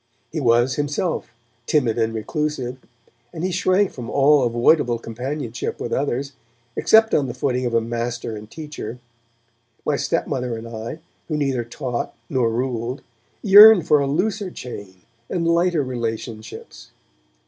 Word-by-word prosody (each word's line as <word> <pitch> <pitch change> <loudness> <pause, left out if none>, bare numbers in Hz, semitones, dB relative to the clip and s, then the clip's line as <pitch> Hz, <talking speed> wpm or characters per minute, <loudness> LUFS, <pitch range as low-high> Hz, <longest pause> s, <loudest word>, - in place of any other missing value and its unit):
He 155 - -3
was, 120 0 +3
himself, 145 +4 -1 0.4
timid 120 -7 +1
and 115 0 +1
reclusive, 130 +2 -3 0.5
and 165 -1 -6
he 185 - 0
shrank 185 +2 +2
from 120 -3 -8
all 145 +1 +4
avoidable 120 +1 +3
companionship 120 +2 -5
with - - -4
others, 140 0 -1 0.4
except 220 0 +4
on 140 -3 +2
the - - -6
footing 125 -2 -1
of 115 - -2
a 115 - +4
master 115 0 -3
and 105 0 -10
teacher. 150 -7 -7 0.9
My 145 - +1
stepmother 125 -8 -1
and 115 +1 -8
I, 115 +5 -6 0.3
who 155 - -2
neither 135 -5 0
taught 120 0 -4 0.2
nor 125 -4 +2
ruled, 120 +1 -3 0.4
yearned 205 -3 +9
for 150 - +5
a 140 - 0
looser 195 +7 -1
chain 100 - -9 0.3
and 170 -2 -1
lighter 170 -2 +2
relationships. 115 - -6
130 Hz, 140 wpm, -22 LUFS, 115-155 Hz, 0.9 s, yearned